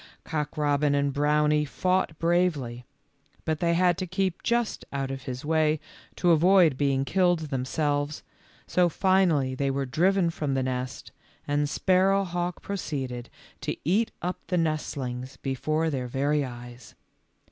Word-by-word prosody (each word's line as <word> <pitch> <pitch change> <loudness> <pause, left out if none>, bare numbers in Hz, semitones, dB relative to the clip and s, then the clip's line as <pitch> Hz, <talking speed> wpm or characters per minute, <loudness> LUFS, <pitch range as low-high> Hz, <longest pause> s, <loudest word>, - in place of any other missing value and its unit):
Cock 150 -3 -3
robin 145 -1 +2
and 140 -1 +1
Brownie 150 +1 +2
fought 180 +2 0
bravely, 160 -9 0 0.6
but 155 -2 -1
they 170 -1 +2
had 175 -1 +3
to 185 - -3
keep 185 0 -1
just 235 -1 0
out 135 -1 -2
of 135 -1 -6
his 125 +2 -5
way 155 -1 +2 0.4
to 175 - +3
avoid 170 -2 +5
being 135 -1 +1
killed 175 0 +2
themselves, 145 +3 -1 0.4
so 180 -1 +2
finally 170 -7 +2
they 140 +1 -1
were 135 0 -1
driven 175 +6 +2
from 145 -4 -2
the 130 - +1
nest, 130 0 -4 0.4
and 145 0 +1
Sparrowhawk 185 -1 +1
pro 200 - -3
ceeded 130 -8 -4 0.3
to - - -3
eat 205 +8 +2
up 180 +1 -2
the 180 - 0
nestlings 135 -5 -2
before 155 +5 -1
their 130 -3 -2
very 140 +4 +1
eyes. 120 -1 -9
150 Hz, 145 wpm, -27 LUFS, 135-175 Hz, 0.6 s, avoid